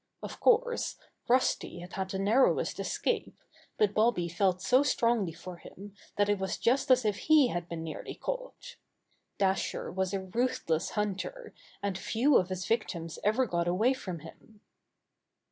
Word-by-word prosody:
Of - - -7
course, 485 0 +2 0.3
Rusty 250 -6 +1
had 175 +2 -10
had 190 -1 -3
the 190 - -3
narrowest 215 +7 +2
es - - -2
cape, - - -1 0.4
but 210 -1 +2
Bobby 215 -5 +2
felt 180 +2 +1
so 250 +8 +4
strongly 235 -8 +1
for 175 +2 -9
him 200 +3 -12 0.2
that 205 0 +2
it 205 -1 +1
was 190 -1 -2
just 255 +4 +1
as 255 -2 +5
if 210 -2 +1
he 300 -5 +4
had 175 -3 -4
been 165 -1 -5
nearly 160 -1 -6
caught. - - -6 0.6
Dasher 195 -1 0
was 190 0 -1
a 195 -1 -2
ruthless 190 -6 -1
hunter, 210 - -3 0.3
and 195 -2 -2
few 250 +9 +2
of 185 - +1
his 185 0 -4
victims 170 -8 -2
ever 220 +5 +3
got 170 -5 -1
away 215 +9 +3
from 185 - -6
him. 205 +6 -15
200 Hz, 160 wpm, -30 LUFS, 180-245 Hz, 0.6 s, as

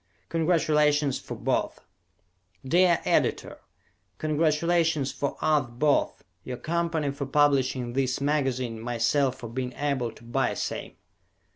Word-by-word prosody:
"Congratulations 150 -4 +2
for - - -7
Both" - - -1 0.8
Dear 175 +4 +4
Editor: - - 0 0.6
Congratulations 155 - +1
for 140 - -3
us 150 -5 +2
both. 140 +5 0 0.2
Your 125 -1 -5
company 165 -1 -1
for 140 -1 -5
publishing 135 -4 +2
this 130 -1 0
magazine, 130 -5 -1
myself 120 +3 +1
for 120 - -8
being 125 +2 -4
able 140 -5 -1
to - - -17
buy 120 +3 -1
same. - - -4
140 Hz, 115 wpm, -26 LUFS, 130-155 Hz, 0.8 s, Dear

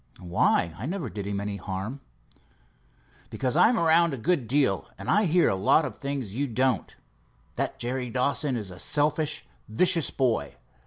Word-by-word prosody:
"Why? 85 -1 +1
I 120 - -4
never 170 - -4
did 100 -2 -5
him 100 -1 -2
any 100 0 -4
harm." 100 +8 -5 1.3
"Because 130 0 -2
I'm 225 +8 +5
around 165 -3 +4
a - - -9
good 140 0 0
deal, 125 - +1
and - - -3
I 210 +1 +4
hear 175 0 +3
a - - +1
lot 100 +11 +3
of - - -6
things 140 -7 -4
you 140 +5 -1
don't. 125 -4 0 0.6
That - - -3
Jerry 125 +1 -3
Dawson 130 +2 0
is 100 -4 -6
a 90 - -10
selfish, 150 +3 0 0.2
vicious 170 +7 +3
boy. 115 - -1
130 Hz, 165 wpm, -26 LUFS, 100-150 Hz, 1.3 s, I'm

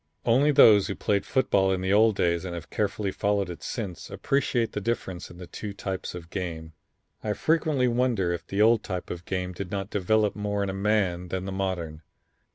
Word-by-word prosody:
"Only 135 +6 +4
those 110 -8 +7
who 100 - -3
played 100 -1 0
football 100 -7 +2
in 95 -1 0
the 95 +1 +1
old 110 0 +5
days 85 -2 +1
and 90 -2 -5
have 85 -2 -8
carefully 105 -1 -1
followed 100 -2 0
it 85 - -9
since 100 -8 -5
appreciate 125 -5 0
the 105 - -4
difference 95 -5 -3
in 85 - -13
the 90 - -8
two 105 +3 -7
types 95 -2 -5
of 85 -1 -9
game. 80 -4 -5 0.5
I 105 - 0
frequently 155 -2 +1
wonder 120 -7 +1
if 85 - -6
the 100 +2 +2
old 115 0 +5
type 90 -3 -5
of 85 0 -7
game 90 -1 -3
did 90 0 -6
not 100 +1 -4
develop 105 +2 +1
more 105 -1 -1
in 100 - -2
a - - -6
man 95 -3 0
than 95 +1 -3
the 95 - -4
modern. 90 -5 -3
100 Hz, 205 wpm, -26 LUFS, 90-110 Hz, 0.5 s, those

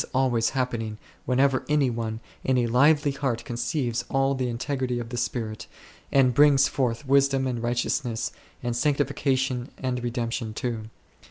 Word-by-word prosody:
This - - -5
is - - -27
always 120 -3 +2
happening 115 -5 -2 0.3
whenever 130 +1 +2
any 145 -4 +3
one 115 -1 -4 0.2
in 130 -1 +2
a 120 - +2
lively 145 +5 +4
heart 135 -4 -2
conceives 120 0 -1
all 135 0 +2
the 130 -2 -1
integrity 125 +1 -2
of 120 -1 -5
the 120 - -5
Spirit, 110 -2 -3 0.4
and 130 -2 +4
brings 140 0 +6
forth 125 0 -1
wisdom 135 0 +3
and 125 -3 -2
righteousness, 120 -1 -1 0.3
and 120 -1 -1
sanctification 135 -2 0
and 125 -2 -2
redemption 115 -2 -3
too. 115 -3 -3
125 Hz, 155 wpm, -26 LUFS, 120-135 Hz, 0.4 s, brings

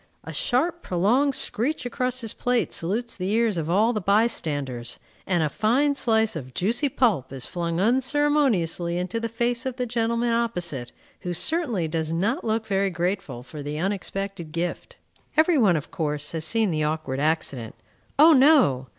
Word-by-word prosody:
A - - -8
sharp, 325 +7 0
prolonged 240 +11 +1
screech 255 +6 -1
across 250 +1 -1
his 225 -2 -4
plate 245 -1 0
salutes 225 +8 -2
the 185 0 -3
ears 225 -1 +2
of 165 -2 -3
all 215 +7 +3
the 215 - -2
bystanders, 145 - 0 0.3
and 175 -4 +2
a - - +2
fine 250 - +2
slice 220 -6 +1
of 130 -5 -7
juicy 235 +9 0
pulp 210 - +1
is 135 -2 -5
flung 170 -1 -3
unceremoniously 250 - +1
into 180 +5 -2
the 230 0 -3
face 235 +1 -1
of 260 -2 -3
the 250 - -2
gentleman 235 0 0
opposite, 175 - -1 0.3
who 175 -1 -4
certainly 240 - 0
does 160 0 -2
not 205 - 0
look 220 0 -1
very 195 -1 +1
grateful 175 -7 -3
for 150 +3 -9
the 145 +1 -4
unexpected 195 -1 -3
gift. 170 +2 -4 0.4
Every 315 -1 +4
one, 200 -7 +4
of 150 - -7
course, 150 -5 -2
has 160 -1 -3
seen 220 +2 +2
the 155 -1 0
awkward 150 -3 -2
accident. 140 -6 -1 0.4
O 315 +3 +8
no! 260 - +5
200 Hz, 170 wpm, -24 LUFS, 165-240 Hz, 0.4 s, O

